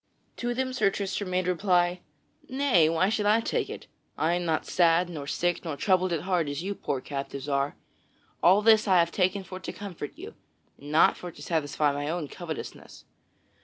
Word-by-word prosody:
To 240 0 -2
them 260 0 -1
Sir 250 -6 +3
Tristram 195 0 -3
made 185 0 0
reply: 180 -1 +2 0.5
"Nay, 260 - +3
why 165 +4 +2
should 210 -1 0
I 215 +2 +5
take 230 - -1
it? - - -8 0.3
I 160 +2 +1
am 175 0 -1
not 160 -1 0
sad, 175 0 +3
nor 150 -5 -6
sick, 175 +3 -1
nor 160 -4 -4
troubled 185 0 +2
at 165 -3 -1
heart 175 -4 0
as 145 +4 -4
you 200 +2 -2
poor 135 -8 -3
captives 140 0 -5
are. 140 0 0 0.7
All 195 +4 +5
this 220 -1 +5
I 190 -2 +5
have 170 -1 +3
taken 190 +2 +1
for 185 0 -8
to - - -6
comfort 185 -7 -7
you, - - -9 0.5
and 145 +1 -9
not 155 - +5
for 180 - -7
to - - -15
satisfy 150 -2 0
my 145 +1 -3
own 160 -3 -3
covetousness. 165 -4 -8
175 Hz, 195 wpm, -27 LUFS, 155-195 Hz, 0.7 s, I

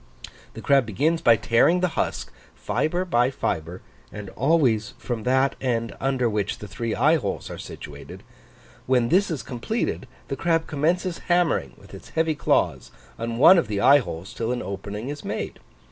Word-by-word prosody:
The - - -8
crab 135 -4 +3
begins 155 - 0
by 115 - +6
tearing 120 - +3
the 180 - +2
husk, - - -3 0.2
fibre 175 +4 -1
by 125 -7 +2
fibre, 85 -8 -4 0.3
and 105 -2 -8
always 130 -7 +1
from 120 -3 -4
that 130 +2 +2
end 115 -3 -1
under 130 -2 0
which 105 -2 -2
the 105 - -9
three 110 +3 -3
eye 155 +3 +4
holes 100 -10 -4
are - - -7
situated; - - -10 0.6
when 125 -2 +2
this 195 +3 +3
is 150 -8 -3
completed, 130 - -3 0.2
the 135 - -3
crab 165 +1 +1
commences 170 +4 -1
hammering 175 - +1
with - - -17
its - - -11
heavy 160 -1 0
claws 150 - 0 0.3
on 115 0 -3
one 175 +8 +8
of - - -2
the 105 -2 -2
eye 140 +7 +7
holes 95 -3 -7
till 115 +1 -2
an 125 - -2
opening 100 +5 -6
is 145 0 -6
made. - - -4
130 Hz, 175 wpm, -24 LUFS, 110-160 Hz, 0.6 s, one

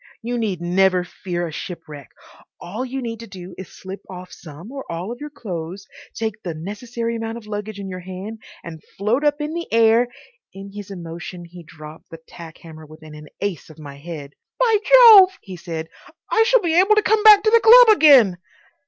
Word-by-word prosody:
"You 240 +1 -3
need 200 -6 -3
never 180 +1 +1
fear 175 -1 -5
a - - -8
shipwreck. 155 -5 -9 0.5
All 200 +8 -6
you 260 0 -5
need 230 -1 -5
do 185 -5 -11
is 190 - -8
just - - -18
slip 190 +1 -8
off 180 -1 -10
some 165 - -12
or 270 -1 -7
all 175 +6 -5
of 240 - -8
your 295 - -7
clothes, 185 - -8 0.3
take 220 -1 -4
the 170 -3 -6
necessary 230 +7 -5
amount 225 0 -5
of 230 - -12
luggage 210 0 -6
in 195 - -7
your 185 -1 -7
hand, 190 +5 -9 0.2
and 160 -2 -10 0.2
float 220 +8 -1
up 295 0 +1
in 300 +1 -4
the 340 0 -6
air—" 230 +1 +3 0.5
In 195 +1 -10
his 205 -1 -9
emotion 175 -1 -9
he 175 +1 -13
dropped 155 -1 -14
the 165 - -10
tack 165 -2 -12
hammer 160 -1 -13
within 155 0 -14
an 150 0 -12
ace 195 -7 -4
of 155 - -15
my 145 -3 -11
head. 145 -2 -9 0.3
"By 460 -3 +3
Jove!" 440 -7 +7
he 190 -2 -11
said, 165 -2 -7 0.4
"I 445 - +3
shall - - +4
be 340 -2 +1
able 400 +3 +4
to 425 - +2
come 435 0 +2
back 420 -1 +7
to 435 - +2
the 465 - +6
club 460 -1 +8
again." 255 - +5
195 Hz, 205 wpm, -20 LUFS, 170-245 Hz, 0.5 s, club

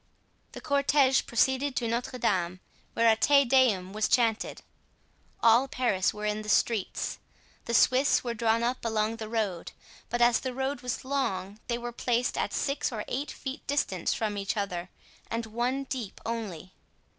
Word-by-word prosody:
The - - -8
cortege 280 -2 +3
proceeded 265 +3 +1
to 235 - -1
Notre 235 +2 -2
Dame, 185 -5 0 0.3
where 230 0 +3
a 225 - +6
Te 280 +4 +4
Deum 235 -8 +3
was 215 0 +1
chanted. 230 -3 +1 0.8
All 235 +4 +6
Paris 235 -8 +1
were 210 0 -6
in 210 0 -1
the 210 - -7
streets. 215 -2 0 0.5
The 235 - -1
Swiss 260 +4 +4
were 240 -2 -2
drawn 230 0 +1
up 245 +2 -1
along 220 0 0
the 220 -1 -6
road, 210 -7 -2 0.4
but 240 - -1
as 240 -1 +5
the 260 -2 -5
road 265 0 -2
was 250 0 -4
long, 215 -7 -2
they 235 0 -1
were 240 0 -5
placed 240 +1 0
at - - -1
six 275 -1 -1
or 215 -3 -4
eight 280 +4 -3
feet 270 +2 -7
distant 200 - 0
from 210 -2 -1
each 200 +2 -2
other 180 -3 -3 0.4
and 230 0 -2
one 240 +5 -1
deep 255 -6 -6
only. 205 -7 -5
235 Hz, 170 wpm, -28 LUFS, 215-260 Hz, 0.8 s, a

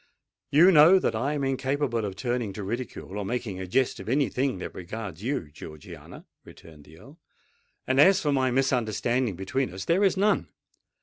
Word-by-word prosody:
"You 170 +6 +6
know 165 +3 +7
that 185 - 0
I 130 +7 -1
am 145 -2 -2
incapable 135 -3 -1
of 95 -2 -5
turning 120 -2 -3
to 105 - -6
ridicule 105 -2 -5
or - - -3
making 105 -3 -4
a 95 - -6
jest 130 +8 0
of - - -8
any 135 +1 +1
thing 130 -3 -1
that 90 - -7
regards 95 -1 -7
you, 115 - -3
Georgiana," 75 0 -12 0.2
returned 75 -3 -16
the 80 +2 -16
Earl. 140 - -16 0.7
"And 130 +1 +1
as 195 +5 +6
for 150 - -1
any 135 -2 +1
misunderstanding 125 -3 0
between 95 +5 -2
us, 95 +1 -7
there 180 +5 +2
is 195 -1 +2
none. 205 +2 +1
125 Hz, 185 wpm, -26 LUFS, 100-140 Hz, 0.7 s, know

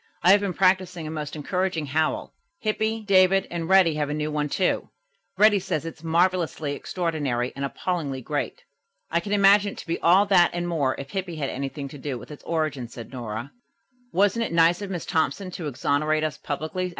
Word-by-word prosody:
"I 180 - +7
have 200 +1 +6
been 195 -4 -2
practising 185 -3 +2
a 155 - -5
most 150 -1 -5
encouraging 180 +1 -1
howl. 155 +3 -1 0.2
Hippy, 220 -1 -1
David 195 -1 +4
and 170 -1 -3
Reddy 190 -4 +6
have 150 -1 -1
a 150 - -2
new 155 0 -2
one, 150 -1 -1
too. 185 +5 0 0.5
Reddy 210 0 +6
says 175 -4 -3
it's 165 -1 -8
'marvelously 165 -3 +1
extraordinary 145 -7 -2
and 140 - -4
appallingly 140 -1 -2
great.'" 150 - -4 0.5
"I 170 - +2
can 200 +4 -6
imagine 200 0 +5
it - - -16
to - - -8
be 165 - -2
all 185 +4 +5
that 185 -4 +5
and 175 0 -2
more 145 -6 0
if 140 +1 -8
Hippy 185 -2 -3
had 145 -3 -2
anything 140 +1 -4
to 145 - -10
do 135 -2 -4
with 120 - -11
its 150 - -11
origin," 155 -7 -1
said 115 0 -10
Nora. 120 0 -5 0.6
"Wasn't 205 +5 +2
it - - -3
nice 170 +2 +4
of 200 - -5
Miss 180 -3 -4
Thompson 185 +4 -1
to 170 -3 -5
exonerate 150 +3 0
us 155 -1 -1
publicly?" 160 +5 -3
165 Hz, 200 wpm, -25 LUFS, 145-185 Hz, 0.6 s, I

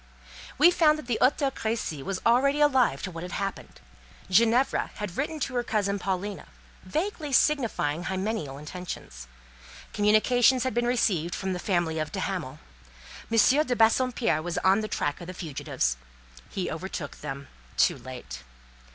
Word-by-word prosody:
We 350 - +7
found 310 -3 +4
that 305 - -8
the 240 -2 -1
Hôtel 275 +1 +3
Crécy 220 - -3
was 190 +6 -3
already 275 +5 +4
alive 265 -4 +3
to 185 - -4
what 165 -1 -7
had 180 +1 -7
happened. 195 0 -5 0.5
Ginevra 230 +6 +3
had 210 -4 -5
written 305 +3 -2
to 260 - -2
her 245 - +1
cousin 205 -3 -1
Paulina, 195 +2 -3 0.4
vaguely 310 - -3
signifying 225 - +1
hymeneal 190 -7 -3
intentions; 150 - -8 0.7
communications 235 +4 +4
had 260 - -1
been 240 +1 0
received 185 -9 +1
from 190 0 -2
the 180 - -4
family 175 -4 0
of 155 - -3
de - - -4
Hamal; - - -3 0.7
M. 230 - +2 0.3
de 250 - +1
Bassompierre 230 -6 +2
was 175 +1 -4
on 195 +3 +4
the 215 - -3
track 145 -5 -2
of 170 - -8
the 185 - -7
fugitives. 135 - -2 0.5
He 185 - -3
overtook 165 -3 -5
them 140 -1 -6 0.3
too - - +3
late. 120 - -8
200 Hz, 155 wpm, -27 LUFS, 170-245 Hz, 0.7 s, We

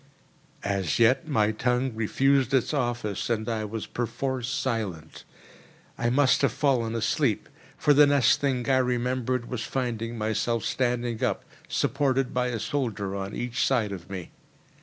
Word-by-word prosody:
As 100 -3 0
yet 125 +7 +3
my 110 -8 +2
tongue 125 +3 0
refused 135 +4 +2
its 130 +3 +1
office, 120 -8 -2
and 110 -1 -1
I 110 -2 -1
was 110 +1 -5
perforce 125 +1 -3
silent. 115 - -3 0.7
I 120 - 0
must 130 +1 +3
have 140 -5 +3
fallen 120 -4 +1
asleep; 115 +1 0 0.3
for 150 - +4
the 145 +1 +7
next 140 -2 +4
thing 130 -4 0
I 135 -1 +4
remembered 125 -1 0
was 125 -3 -4
finding 120 -3 -3
myself 110 +1 -1
standing 120 -2 -1
up, 115 -6 -1 0.2
supported 135 0 0
by 125 0 +1
a 120 -2 -2
soldier 105 -8 -2
on 100 +1 -4
each 120 0 -1
side 115 -6 +1
of 95 -4 -8
me. 95 -3 -6
120 Hz, 150 wpm, -26 LUFS, 110-130 Hz, 0.7 s, the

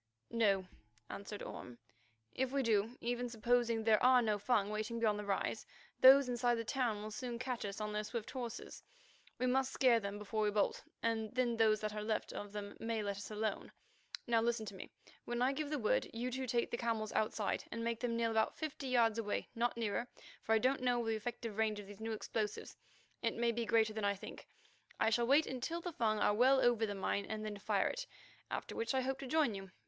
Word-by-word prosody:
"No," 200 -5 +2 0.5
answered 200 +1 -6
Orme. 125 -1 -8 0.6
"If 260 0 -1
we 275 -1 +1
do, 225 +1 +1
even 245 +1 -1
supposing 235 0 +1
there 220 -1 +4
are 255 0 +7
no 210 -2 +1
Fung 210 -2 +1
waiting 215 +2 -2
beyond 215 -2 +2
the 210 - -5
rise, 200 -1 -1 0.3
those 265 +1 +9
inside 245 0 +1
the 230 0 -3
town 230 -5 -1
will 215 - -6
soon 240 +2 -4
catch 250 -2 -3
us 200 +1 -5
on 210 0 -3
their 210 0 -1
swift 225 +1 -5
horses. 240 -3 -6 0.6
We 255 - 0
must 265 +1 +2
scare 250 -4 +4
them 200 -1 -4
before 210 +1 -3
we 210 - +3
bolt, 205 0 0 0.2
and 225 -1 -1
then 245 -2 +2
those 220 -2 +3
that 215 -1 -2
are 210 - -3
left 215 +1 -2
of 205 -1 -6
them 205 -1 -6
may 225 -1 -2
let 200 -1 -2
us 200 - -7
alone. 215 -1 -3 0.5
Now 230 -2 +3
listen 230 -1 0
to 205 - -7
me. 190 - -9 0.4
When 240 0 -2
I 255 +2 +3
give 295 +1 -3
the 300 - -1
word, 215 -5 +1
you 240 +2 -3
two 260 +1 -3
take 235 0 0
the 235 - -1
camels 225 -3 -1
outside 215 -1 0
and 230 - -3
make 230 -1 -1
them 235 -2 -1
kneel 230 -1 +1
about 220 0 +1
fifty 295 -3 -4
yards 230 -3 +3
away, 210 -2 -2
not 240 0 0
nearer, 230 +1 -1 0.3
for 225 - +2
I - - +6
don't 255 +4 +2
know 245 -2 +1
the 225 - +1
effective 220 -1 -4
range 215 -1 +1
of 205 - -8
these 205 +1 -11
new 225 0 -2
explosives; 215 -1 -3 0.5
it 230 -1 0
may 235 0 +2
be 230 0 -2
greater 220 -1 +3
than 215 -1 -4
I 200 0 +2
think. 195 - -10 0.5
I 220 - +3
shall 235 +1 +2
wait 285 +4 +5
until 260 +7 -3
the 345 0 -5
Fung 220 -5 +1
are 210 - +3
well 260 +5 +5
over 235 -3 +3
the 205 - -3
mine 195 +1 -1
and 215 0 -4
then 205 -1 -5
fire - - +1
it, - - -5 0.4
after - - -4
which 455 -11 -1
I 260 - +3
hope 265 +1 -2
to 275 - -6
join 295 -4 +2
you. 195 -1 -7
230 Hz, 225 wpm, -36 LUFS, 215-245 Hz, 0.6 s, those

